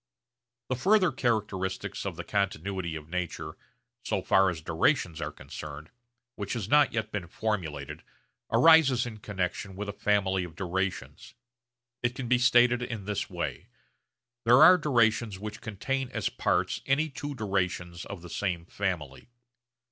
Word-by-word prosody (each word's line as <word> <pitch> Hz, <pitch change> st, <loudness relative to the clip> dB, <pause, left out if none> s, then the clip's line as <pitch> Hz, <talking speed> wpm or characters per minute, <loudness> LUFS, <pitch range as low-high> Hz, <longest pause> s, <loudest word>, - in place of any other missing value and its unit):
The 130 Hz, -, +1 dB
further 185 Hz, -, +3 dB
characteristics 100 Hz, -6 st, -2 dB
of 95 Hz, -, -4 dB
the 85 Hz, -, -6 dB
continuity 95 Hz, -3 st, -2 dB
of 75 Hz, -1 st, -8 dB
nature 80 Hz, -3 st, -4 dB, 0.5 s
so -, -, -1 dB
far 95 Hz, 0 st, +4 dB
as 85 Hz, -3 st, -4 dB
durations 85 Hz, -, 0 dB
are -, -, -3 dB
concerned 75 Hz, +2 st, -9 dB, 0.4 s
which 100 Hz, -2 st, -4 dB
has 115 Hz, -6 st, -3 dB
not 145 Hz, +3 st, +5 dB
yet 110 Hz, -1 st, -3 dB
been 95 Hz, -5 st, -4 dB
formulated 80 Hz, -8 st, -3 dB, 0.5 s
arises 160 Hz, -7 st, +6 dB
in 110 Hz, -3 st, -7 dB
connexion 95 Hz, -1 st, -3 dB
with 105 Hz, +2 st, -5 dB
a 100 Hz, -, -4 dB
family 95 Hz, -2 st, +1 dB
of 85 Hz, -3 st, -9 dB
durations. 95 Hz, +4 st, -3 dB, 0.7 s
It 120 Hz, 0 st, 0 dB
can 130 Hz, -2 st, -4 dB
be 125 Hz, +1 st, +3 dB
stated 120 Hz, 0 st, +5 dB
in 115 Hz, -5 st, -5 dB
this 105 Hz, -1 st, -2 dB
way: -, -, -4 dB, 0.8 s
There 125 Hz, +6 st, +7 dB
are 180 Hz, +3 st, +8 dB
durations 115 Hz, -, +2 dB
which 105 Hz, +2 st, -7 dB
contain 130 Hz, +5 st, -3 dB
as 110 Hz, -6 st, -2 dB
parts -, -, 0 dB
any 140 Hz, +4 st, +2 dB
two 145 Hz, 0 st, -5 dB
durations 90 Hz, -5 st, -2 dB
of 95 Hz, -4 st, -8 dB
the 85 Hz, -, -9 dB
same 90 Hz, -5 st, -2 dB
family. 90 Hz, -, -4 dB
100 Hz, 150 wpm, -28 LUFS, 90-120 Hz, 0.8 s, are